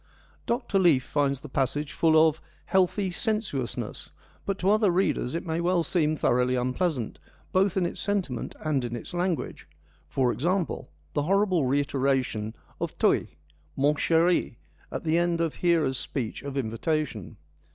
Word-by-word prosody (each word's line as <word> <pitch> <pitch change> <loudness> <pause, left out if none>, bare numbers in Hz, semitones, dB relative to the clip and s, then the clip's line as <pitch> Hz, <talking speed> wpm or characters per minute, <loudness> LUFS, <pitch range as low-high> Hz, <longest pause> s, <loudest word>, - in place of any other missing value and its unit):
Dr. 235 -4 +1
Leaf 160 -9 +4
finds 140 -2 0
the 150 - -8
passage 135 +2 -1
full 160 -1 +5
of 160 0 -2
' - - -33
healthy 190 +1 +2
sen 215 +4 +1
suousness,' 135 - -5 0.4
but 195 -1 0
to 190 +2 +2
other 215 -1 +4
readers 175 -6 +1
it 170 - -3
may 165 0 -1
well 175 0 +2
seem 155 -3 +1
thoroughly 125 -2 +2
unpleasant, 125 - -1 0.3
both 190 0 +2
in 185 - +2
its - - -3
sentiment 190 - -2
and 145 -4 +1
its 120 +3 -5
language 175 -1 -2 0.2
— - - -34
for 130 -2 +2
example, 175 +6 -1 0.2
the 145 - +1
horrible 185 -3 +2
reiteration 135 -5 0 0.2
of - - -4
toi, - - +3 0.2
' 75 0 -35
mon 145 +2 +3
cheri/ 165 -2 +2 0.4
at - - -4
the 165 +1 +2
end 175 -1 +1
of 165 -2 0
Hera's 165 -7 +1
speech 120 -6 -4
of 140 -1 -5
invitation. 125 - -2
155 Hz, 160 wpm, -27 LUFS, 130-180 Hz, 0.4 s, full